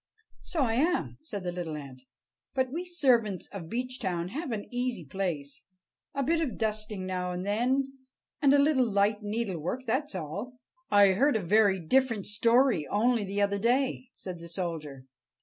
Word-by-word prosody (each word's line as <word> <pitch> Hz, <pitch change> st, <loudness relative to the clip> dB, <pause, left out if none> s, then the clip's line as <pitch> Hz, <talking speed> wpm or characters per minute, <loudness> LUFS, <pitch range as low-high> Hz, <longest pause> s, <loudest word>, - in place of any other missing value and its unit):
"So 320 Hz, -6 st, -1 dB
I 225 Hz, -3 st, +1 dB
am," 320 Hz, +9 st, +1 dB
said 210 Hz, -11 st, -6 dB
the 180 Hz, -, -2 dB
little 170 Hz, -3 st, -4 dB
ant. 135 Hz, -3 st, -9 dB, 0.5 s
"But 260 Hz, -1 st, +1 dB
we 340 Hz, +5 st, -3 dB
servants 245 Hz, -, +2 dB
of 175 Hz, -5 st, -7 dB
Beechtown 230 Hz, -8 st, -2 dB
have 295 Hz, -, -4 dB
an 210 Hz, -2 st, -3 dB
easy 245 Hz, -7 st, -2 dB
place. 150 Hz, -4 st, -3 dB, 0.5 s
A 275 Hz, -, 0 dB
bit 325 Hz, +4 st, +2 dB
of 260 Hz, -10 st, -2 dB
dusting 215 Hz, -3 st, -2 dB
now 180 Hz, -1 st, -2 dB
and 180 Hz, +1 st, -4 dB
then, 245 Hz, +7 st, +2 dB, 0.6 s
and 280 Hz, -, +5 dB
a 285 Hz, -, +6 dB
little 280 Hz, -4 st, +3 dB
light 205 Hz, +2 st, +2 dB
needlework; 210 Hz, +1 st, -3 dB
that's 260 Hz, +1 st, -1 dB
all." 195 Hz, -, -5 dB, 0.3 s
"I 205 Hz, -1 st, +7 dB
heard 255 Hz, +9 st, +3 dB
a 215 Hz, -, 0 dB
very 200 Hz, +1 st, +4 dB
different 230 Hz, +3 st, +2 dB
story 230 Hz, -, +3 dB
only 230 Hz, +2 st, +2 dB
the 200 Hz, +1 st, 0 dB
other 200 Hz, 0 st, +1 dB
day," 255 Hz, +3 st, +1 dB
said 180 Hz, -3 st, -7 dB
the 170 Hz, 0 st, -10 dB
soldier. 160 Hz, -7 st, -5 dB
215 Hz, 165 wpm, -29 LUFS, 185-255 Hz, 0.6 s, I